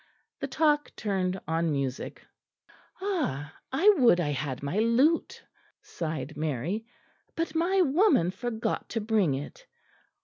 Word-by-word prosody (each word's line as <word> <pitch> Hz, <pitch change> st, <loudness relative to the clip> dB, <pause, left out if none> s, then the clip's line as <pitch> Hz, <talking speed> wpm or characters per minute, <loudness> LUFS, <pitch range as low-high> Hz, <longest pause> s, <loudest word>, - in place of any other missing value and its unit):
The -, -, -3 dB
talk 295 Hz, -2 st, +2 dB
turned 190 Hz, -3 st, -1 dB
on 165 Hz, 0 st, 0 dB
music. 140 Hz, -2 st, -3 dB, 0.8 s
"Ah! 165 Hz, -, -2 dB, 0.2 s
I 320 Hz, +10 st, +2 dB
would 235 Hz, -9 st, +5 dB
I 150 Hz, -4 st, 0 dB
had 135 Hz, -1 st, -3 dB
my 145 Hz, +9 st, -1 dB
lute," 255 Hz, +9 st, +2 dB, 0.4 s
sighed 155 Hz, -3 st, -5 dB
Mary, 155 Hz, -, -2 dB, 0.5 s
"but 330 Hz, -1 st, -2 dB
my 355 Hz, +4 st, +2 dB
woman 305 Hz, -, +3 dB
forgot 225 Hz, +3 st, -3 dB
to 230 Hz, -, -2 dB
bring 210 Hz, -9 st, +2 dB
it. 325 Hz, -, -8 dB
200 Hz, 125 wpm, -28 LUFS, -, 0.8 s, would